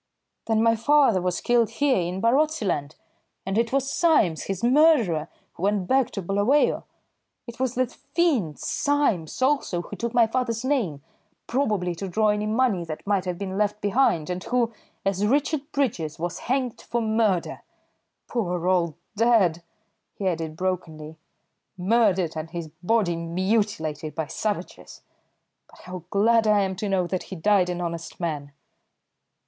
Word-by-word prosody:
"Then 225 Hz, -1 st, +2 dB
my 230 Hz, 0 st, +4 dB
father 230 Hz, -4 st, +3 dB
was 180 Hz, 0 st, -1 dB
killed 240 Hz, -2 st, +3 dB
here 265 Hz, +1 st, +1 dB
in 180 Hz, +2 st, -3 dB
Barotseland, 230 Hz, -, +1 dB, 0.5 s
and 195 Hz, +1 st, -2 dB
it 230 Hz, +1 st, +1 dB
was 275 Hz, 0 st, 0 dB
Symes, 295 Hz, -, +2 dB
his 195 Hz, +1 st, -4 dB
murderer, 245 Hz, -, +4 dB, 0.3 s
who -, -, -13 dB
went 200 Hz, -1 st, +1 dB
back 265 Hz, -2 st, +3 dB
to 195 Hz, -, -4 dB
Bulawayo. 205 Hz, +11 st, +2 dB, 0.6 s
It 235 Hz, 0 st, -10 dB
was 255 Hz, -1 st, -1 dB
that 255 Hz, -1 st, 0 dB
fiend 265 Hz, -, 0 dB
Symes, 260 Hz, -, 0 dB
also, 260 Hz, -11 st, +1 dB
who -, -, -8 dB
took 235 Hz, 0 st, -3 dB
my 235 Hz, -1 st, +5 dB
father's 230 Hz, 0 st, -2 dB
name, 205 Hz, -, -1 dB, 0.4 s
probably 210 Hz, -9 st, 0 dB
to 195 Hz, +4 st, -5 dB
draw 215 Hz, +3 st, +2 dB
any 210 Hz, 0 st, 0 dB
money 220 Hz, -5 st, +1 dB
that 160 Hz, -2 st, -7 dB
might 200 Hz, -2 st, +1 dB
have 180 Hz, -1 st, -3 dB
been 190 Hz, 0 st, -4 dB
left 210 Hz, 0 st, 0 dB
behind, 200 Hz, -, +1 dB
and 180 Hz, +1 st, -4 dB
who, 240 Hz, -2 st, 0 dB, 0.3 s
as 195 Hz, 0 st, 0 dB
Richard 290 Hz, +3 st, 0 dB
Bridges, 200 Hz, -, -1 dB
was 175 Hz, +1 st, -4 dB
hanged 255 Hz, -1 st, -2 dB
for 235 Hz, -, -2 dB
murder. 220 Hz, -5 st, 0 dB, 0.7 s
Poor 180 Hz, -7 st, -2 dB
old 175 Hz, -4 st, +2 dB, 0.2 s
dad," 205 Hz, -7 st, +3 dB, 0.5 s
he 195 Hz, -, -2 dB
added 160 Hz, -3 st, -2 dB
brokenly, 160 Hz, -4 st, -4 dB, 0.6 s
"murdered, 190 Hz, -4 st, +2 dB
and 155 Hz, +1 st, -5 dB
his 170 Hz, -2 st, -6 dB
body 190 Hz, -2 st, +1 dB
mutilated 170 Hz, -3 st, -1 dB
by 160 Hz, -, -2 dB
savages! 210 Hz, +6 st, -5 dB, 0.7 s
But -, -, -18 dB
how 180 Hz, -2 st, -8 dB
glad 220 Hz, +3 st, +3 dB
I 210 Hz, -1 st, +4 dB
am 190 Hz, -1 st, -1 dB
to 205 Hz, +1 st, -3 dB
know 190 Hz, -2 st, +1 dB
that 185 Hz, +1 st, -2 dB
he 190 Hz, -, -5 dB
died 185 Hz, +1 st, +2 dB
an 175 Hz, 0 st, -3 dB
honest 170 Hz, -1 st, -5 dB
man!" 150 Hz, -5 st, -4 dB
200 Hz, 155 wpm, -25 LUFS, 175-235 Hz, 0.7 s, my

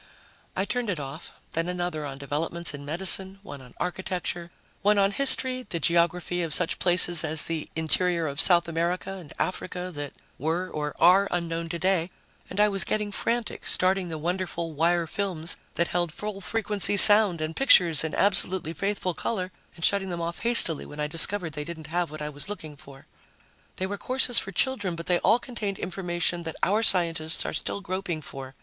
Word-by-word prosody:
I 190 Hz, -, -1 dB
turned 245 Hz, 0 st, -3 dB
it 180 Hz, -6 st, -2 dB
off, 140 Hz, +3 st, -8 dB, 0.2 s
then 165 Hz, +1 st, -1 dB
another 175 Hz, -4 st, -3 dB
on 135 Hz, -1 st, -8 dB
developments 155 Hz, +4 st, -2 dB
in 145 Hz, 0 st, -8 dB
medicine, 190 Hz, +5 st, +2 dB
one 145 Hz, -9 st, -10 dB
on 125 Hz, -2 st, -16 dB
architecture, 180 Hz, -1 st, -4 dB, 0.3 s
one 205 Hz, +1 st, +3 dB
on 195 Hz, 0 st, +3 dB
history, 255 Hz, +1 st, +3 dB
the 170 Hz, -, -3 dB
geography 175 Hz, +2 st, 0 dB
of 165 Hz, -3 st, +1 dB
such 180 Hz, -1 st, -1 dB
places 175 Hz, -2 st, +5 dB
as 155 Hz, 0 st, +4 dB
the 165 Hz, -2 st, -2 dB
interior 170 Hz, +1 st, 0 dB
of 145 Hz, 0 st, -1 dB
South 175 Hz, -2 st, +3 dB
America 170 Hz, +3 st, -2 dB
and 180 Hz, -6 st, -10 dB
Africa 180 Hz, 0 st, -4 dB
that 145 Hz, -2 st, -7 dB, 0.3 s
were 165 Hz, +5 st, -2 dB
or 150 Hz, -4 st, -5 dB
are 185 Hz, +4 st, +5 dB
unknown 170 Hz, -1 st, -3 dB
today, 175 Hz, 0 st, 0 dB, 0.4 s
and -, -, -6 dB
I 210 Hz, -, +5 dB
was 195 Hz, -3 st, +2 dB
getting 210 Hz, -1 st, -2 dB
frantic, 230 Hz, +2 st, -3 dB
starting 185 Hz, -1 st, +1 dB
the 160 Hz, -, -5 dB
wonderful 170 Hz, 0 st, -3 dB
wire 170 Hz, +3 st, +1 dB
films 175 Hz, -2 st, -3 dB, 0.2 s
that 170 Hz, -, 0 dB
held 175 Hz, -2 st, -1 dB
full 210 Hz, +3 st, -7 dB
frequency 205 Hz, +2 st, +1 dB
sound 205 Hz, -4 st, +9 dB
and 155 Hz, +1 st, -4 dB
pictures 175 Hz, -, +5 dB
in 160 Hz, -, -4 dB
absolutely 190 Hz, -4 st, +1 dB
faithful 195 Hz, -1 st, -2 dB
color, 185 Hz, 0 st, -3 dB, 0.2 s
and 165 Hz, -, -2 dB
shutting 195 Hz, -1 st, +2 dB
them 175 Hz, -1 st, -4 dB
off 170 Hz, 0 st, -4 dB
hastily 230 Hz, -10 st, +3 dB
when 150 Hz, -, -11 dB
I 150 Hz, -, -1 dB
discovered 165 Hz, +2 st, +2 dB
they 150 Hz, -1 st, -4 dB
didn't 160 Hz, -1 st, -9 dB
have 175 Hz, -1 st, 0 dB
what 155 Hz, 0 st, -8 dB
I 150 Hz, -, -4 dB
was 145 Hz, +4 st, -7 dB
looking 160 Hz, -8 st, -7 dB
for. 140 Hz, -1 st, -15 dB, 0.7 s
They 185 Hz, -, -3 dB
were 200 Hz, +1 st, -5 dB
courses 255 Hz, -2 st, +3 dB
for 195 Hz, -, -6 dB
children, 205 Hz, -8 st, 0 dB
but 165 Hz, 0 st, -8 dB
they 175 Hz, -1 st, +1 dB
all 225 Hz, -, +4 dB
contained 225 Hz, -6 st, -5 dB
information 175 Hz, -1 st, -2 dB
that 165 Hz, -1 st, -6 dB
our 210 Hz, +4 st, +2 dB
scientists 165 Hz, -6 st, +2 dB
are -, -, -4 dB
still 200 Hz, -, -3 dB
groping 185 Hz, -4 st, -4 dB
for 135 Hz, -1 st, -9 dB
175 Hz, 185 wpm, -26 LUFS, 160-195 Hz, 0.7 s, sound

